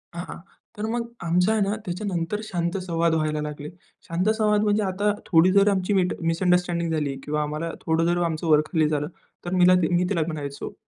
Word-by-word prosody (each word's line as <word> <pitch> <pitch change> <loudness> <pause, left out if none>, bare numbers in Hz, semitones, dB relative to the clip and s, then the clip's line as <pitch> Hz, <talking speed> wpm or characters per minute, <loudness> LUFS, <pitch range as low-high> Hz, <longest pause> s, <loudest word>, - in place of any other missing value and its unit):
हां. 175 - -6 0.4
तर 210 - -3
मग 235 0 -1 0.2
आमच 180 +2 +2
आहे 220 -1 +2
ना 200 +1 +1
त्याच्यानंतर 180 +1 -3
शांत 175 -3 -2
संवाद 170 -1 +1
व्हायला 155 -1 -1
लागले. 150 0 -6 0.4
शांत 180 +5 0
संवाद 210 -1 +2
म्हणजे 210 0 +2
आता 200 +2 0
थोडी 175 +1 +4
जर 200 +1 +5
आमची 195 0 0
मिस 185 -2 +3
मिसअंडरस्टँडिंग 170 0 +1
झाली 150 -3 -1
किंवा 150 +1 -1
आम्हाला 155 +3 -3
थोडं 160 0 +1
जर 175 +1 +1
आमचं 165 0 -2
वर-खाली 155 +1 +3
झालं, 150 -1 -1 0.4
तर 175 - -3
मिला 180 0 +6
ती 160 - +2
मी 180 - +2
तिला 165 - 0
म्हणायचो 145 -3 -5
170 Hz, 190 wpm, -24 LUFS, 160-190 Hz, 0.4 s, मिला